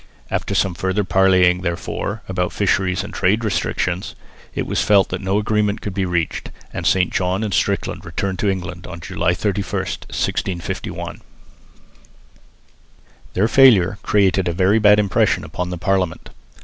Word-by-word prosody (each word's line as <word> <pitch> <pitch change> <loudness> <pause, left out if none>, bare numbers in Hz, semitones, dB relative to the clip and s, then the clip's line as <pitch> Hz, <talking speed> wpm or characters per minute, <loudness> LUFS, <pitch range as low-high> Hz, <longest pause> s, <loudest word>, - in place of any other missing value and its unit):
After - - -2
some 95 - +2
further 95 +4 -1
parleying 95 -2 +3
therefore 95 +4 -3
about 90 -1 -1
fisheries 95 -2 0
and - - -8
trade 105 +5 +1
restrictions, 95 -3 -2 0.4
it - - -1
was - - -1
felt 100 -2 +4
that 90 - -4
no 95 +1 0
agreement 105 -1 0
could 100 - -5
be 95 -1 -1
reached; 85 -2 -2 0.2
and - - -2
St 90 -1 +2
John 95 +3 0
and 105 -3 -2
Strickland - - -1
returned 95 -1 -3
to 105 - +1
England 90 -2 -4
on 85 -2 -8
July 90 0 -1
31, 100 0 -2
1651. 90 -3 -4 2.1
Their 100 +4 +3
failure 110 -7 +5
created 95 -3 +2
a 85 - 0
very 95 +5 +3
bad 105 -1 +6
impression 105 -2 +2
upon 90 0 -4
the 90 - -4
Parliament. 90 -1 -1
95 Hz, 150 wpm, -20 LUFS, 90-100 Hz, 2.1 s, bad